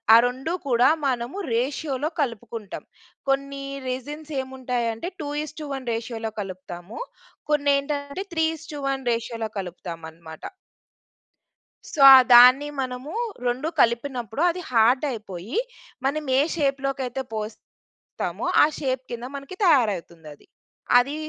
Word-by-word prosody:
ఆ - - +10
2 265 +7 -3
కూడా 245 +1 +5 0.2
మనము 245 +6 -2 0.2
రేషియోలో 275 +4 -1
కలుపుకుంటాం. 230 -4 -5 0.4
కొన్ని 275 0 -1 0.3
రెజిన్స్ 295 +5 -6
ఏముంటాయంటే 250 +1 -3
2:1 290 -2 -5
రేషియోలో 225 -1 -4
కలుపుతాము. 185 - -8 0.5
కొన్ని 285 -1 +3
ఏంటంటే 285 +5 -3
3:1 300 -5 -2
రేషియోలో 230 -1 -3
కలుపుతాము 175 -3 -6
అన్నమాట. 160 -1 -13 1.5
సో 285 - 0
ఆ! - - +12 0.2
దాన్ని 255 +4 +8
మనము 255 +3 -5 0.4
రెండు 255 +6 -1
కలిపినప్పుడు 240 +1 0
అది 360 - -6
హార్డ్ 240 +3 +4
అయిపోయి, 210 - -6 0.5
మనం 300 +3 0 0.2
ఏ - - +6
షేప్‌లో 275 -2 0
కైయితే 260 0 -3
పోస్తామో, 215 0 -7 0.8
ఆ - - +8
షేప్ 260 -2 -1
కింద 240 0 -5
మనకి 275 +7 -9
తయారయితుంది 200 - +2
అది. - - -25 0.5
అది 275 +4 -1
255 Hz, 110 wpm, -24 LUFS, 230-285 Hz, 1.5 s, ఆ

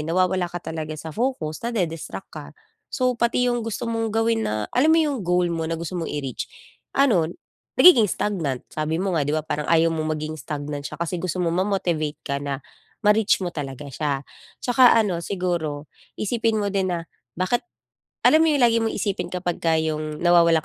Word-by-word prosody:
nawawala 180 +3 +1
ka 175 - -7
talaga 160 -2 -5
sa 160 +1 -7
focus 220 - -2
nade-distract 180 -9 -3
ka. - - -8 0.4
So 255 -1 +1
pati 235 +1 +1
yung 240 - -1
gusto 225 -1 -4
mong 225 -1 -1
gawin 225 +1 +1
na 105 0 -1
alam 260 +5 +3
mo 320 - +6
yung 295 -4 +1
goal 180 -1 +1
mo 165 -1 -2
na 165 - -1
gusto 170 +2 -5
mo 165 - -3
i-reach, 135 -4 -4 0.5
ano, 215 - +4 0.5
nagiging 245 - +8
stagnant. 160 -11 -2
Sabi 155 +1 -1
mo 190 +1 -1
nga 160 - +2
'di 145 +2 0
ba 155 - -2
parang 150 -1 -3
ayaw 165 0 +4
mong 155 -1 -1
maging 155 +1 -4
stagnant 145 +1 -4
siya - - -8
kasi 170 +1 -2
gusto 185 -1 -2
mong 170 +2 +1
ma-motivate 175 -6 -1
ka 140 0 -2
na 140 -1 -4 0.4
ma-reach 210 -2 +4
mo 175 - -3
talaga 140 -2 -6
siya. 145 -2 -2
At - - -22
saka 245 -1 +6
ano 195 -7 +2
siguro, 170 -6 -2 0.3
isipin 225 +1 0
mo 205 -2 -1
din 195 -1 +1
na 170 -2 -2 0.3
bakit 185 +7 +1 0.6
alam 315 - +7
mo 325 - +4
yung 285 -4 +2
lagi 230 -1 +4
mong 225 -1 -1
isipin 200 -2 -2
kapagka 175 -2 0
yung 155 -1 -2
nawawalan 170 -2 +5
175 Hz, 190 wpm, -23 LUFS, 155-220 Hz, 0.6 s, nagiging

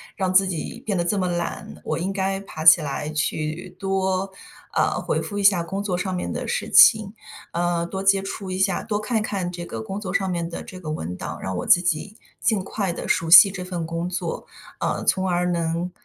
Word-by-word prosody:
让 190 -3 -1
自 190 +1 +5
己 175 -4 -4
变 200 -3 -1
得 175 - +1
这 190 +4 0
么 185 -2 0
懒， 170 - -4
我 - - -2
应 190 +3 -2
该 195 0 -1
爬 175 -5 -8
起 160 +1 +9
来 150 +1 -4
去， 155 +3 -3
多， 190 0 -1 0.4
呃， - - +2
回 - - -1
复 205 - -5
一 200 - -1
下 195 -3 +5
工 195 +4 -4
作 185 -3 -1
上 185 0 -2
面 180 - -3
的 - - -4
事 - - -2
情， 215 -3 +6 0.4
呃， 170 0 0
多 190 +3 -5
接 195 0 +3
触 195 0 -6
一 185 - -3
下 190 -1 +1
多 210 -2 -2
看 220 0 0
看 195 -4 -3
这 175 -1 -6
个 110 -7 -6
工 195 - -5
作 190 -3 -5
上 190 -1 0
面 170 -1 -2
的 170 - -6
这 185 - -10
个 160 -4 -5
文 90 - -5
档， - - -6
让 95 -1 -3
我 - - -3
自 175 - +6
己， 180 +4 -2 0.2
尽 215 -5 +1
快 190 -3 -2
地 - - -6
熟 165 0 0
悉 175 +4 +10
这 180 -1 -6
份 175 -3 -4
工 165 +1 -3
作， 200 - -4 0.3
啊， - - -2
从 190 0 +1
而 180 0 +1
能 170 +1 -1
185 Hz, 245 characters per minute, -23 LUFS, 170-195 Hz, 0.4 s, 悉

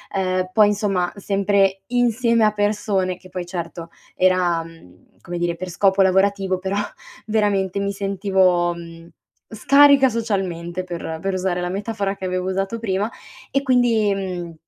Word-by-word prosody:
ehm, 185 -1 0
poi 215 -2 +6
insomma 195 -4 0
sempre 195 -1 +1
insieme 235 -2 +2
a 210 - +2
persone, 205 -3 0
che 185 - -16
poi 180 -1 -5
certo 170 -1 -6 0.3
era, 180 -2 +2
mhmm, 165 - -18
come 175 0 -6
dire, 170 0 -1
per 185 0 -6
scopo 190 +2 +2
lavorativo 190 0 +2
però 190 +1 -3 0.5
veramente 205 -3 0
mi 200 - -1
sentivo, 190 -3 +1
mhmm, 165 0 -11 0.4
scarica 275 +4 +5
socialmente 185 -6 -3
per 165 -2 -5
per 195 0 -2
usare 185 -1 -1
la 175 - -2
metafora 200 0 -3
che 195 - -12
avevo 185 0 -2
usato 195 +4 -2
prima; 205 +1 -1 0.4
e 275 - +1
quindi, 240 -6 +2
mhmm, 180 -3 -5
190 Hz, 145 wpm, -21 LUFS, 180-205 Hz, 0.5 s, poi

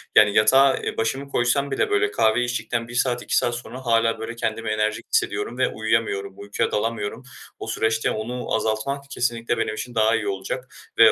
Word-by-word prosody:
yani 105 -1 +7
yatağa, 135 +5 +5
eee, - - -4
başımı 135 +5 -1
koysam 140 +2 +1
bile 135 - +1
böyle 410 0 +2
kahve 110 - +3
içtikten 115 -1 -2
1 120 - -9
saat 125 -1 +1
2 - - 0
saat 120 - +1
sonra 125 +2 -8
hâlâ 115 -1 +2
böyle 115 +1 -5
kendimi 115 -1 -2
enerjik 110 0 -1
hissediyorum 120 - 0
ve 130 0 +3
uyuyamıyorum, 110 -3 -1
uykuya 100 0 -2
dalamıyorum. 115 +2 -2 0.4
O - - -6
süreçte 110 0 0
onu 120 +3 -3
azaltmak 110 +6 -1
kesinlikle 120 -3 -1
benim 110 - -1
için 120 +2 -6
daha 110 0 +4
iyi 110 -2 -2
olacak 100 +6 -3 0.3
ve 115 -1 +8
115 Hz, 185 wpm, -23 LUFS, 110-125 Hz, 0.4 s, ve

